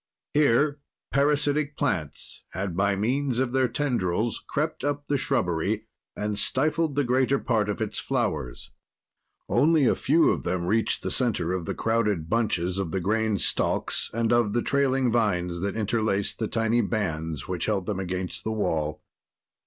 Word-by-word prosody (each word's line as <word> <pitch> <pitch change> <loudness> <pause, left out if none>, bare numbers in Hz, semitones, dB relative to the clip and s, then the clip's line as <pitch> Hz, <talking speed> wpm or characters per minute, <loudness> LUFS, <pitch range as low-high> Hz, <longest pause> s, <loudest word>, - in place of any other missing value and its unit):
Here 145 0 +3 0.3
parasitic 145 +1 +1
plants 80 -8 -2
had, 95 -1 -3
by 100 +2 +2
means 125 +5 0
of 130 -1 +1
their 130 0 +2
tendrils, 120 -6 -1
crept 155 -1 -2
up 145 0 -1
the 145 - +1
shrubbery 90 - 0 0.3
and 105 0 -2
stifled 150 +2 +1
the 145 - +2
greater 130 +2 +2
part 110 -6 0
of 105 - -1
its - - -4
flowers. 60 -1 -2 0.8
Only 155 -1 +4
a - - +4
few 160 +4 +3
of - - -1
them 90 0 -2
reached 110 +5 0
the - - -2
center 100 -9 +1
of 90 -3 -2
the - - -3
crowded 105 -8 0
bunches 95 -5 0
of 95 -4 -1
the 95 - -1
grain 110 +3 +1
stalks - - -1
and 115 +1 +1
of 120 -4 +2
the 120 - +1
trailing 135 -3 +2
vines 90 -7 +1
that 100 +2 -2
interlaced 110 -2 0
the 110 - 0
tiny 115 +1 +1
bands 80 - -2
which 90 -2 -2
held 100 -4 0
them 100 -1 -2
against 90 -1 -4
the 110 - -2
wall. 80 -8 -1
110 Hz, 160 wpm, -26 LUFS, 95-130 Hz, 0.8 s, Only